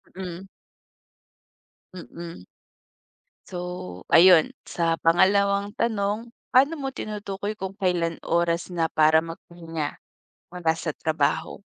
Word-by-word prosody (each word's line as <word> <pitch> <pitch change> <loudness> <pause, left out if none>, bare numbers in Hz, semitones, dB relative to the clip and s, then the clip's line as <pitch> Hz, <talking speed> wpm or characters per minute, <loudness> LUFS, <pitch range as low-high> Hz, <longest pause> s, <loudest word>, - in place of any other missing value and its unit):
Mm. 185 -1 -7 1.5
Mm. 170 - -9 1.0
So, 180 - -8 0.5
ayun, 170 -2 +6
sa 165 -1 0
pangalawang 200 +4 +3
tanong, 220 +1 -1 0.2
paano 275 +5 +6
mo 270 - -3
tinutukoy 205 -1 -4
kung 190 0 -5
kailan 175 -4 0
oras 170 +1 0
na 165 -2 0
para 155 0 +5
magpahinga, 165 -2 -6 0.5
mula 175 -2 0
sa 160 -2 -4
trabaho? 160 0 -1
175 Hz, 100 wpm, -25 LUFS, 165-200 Hz, 1.5 s, ayun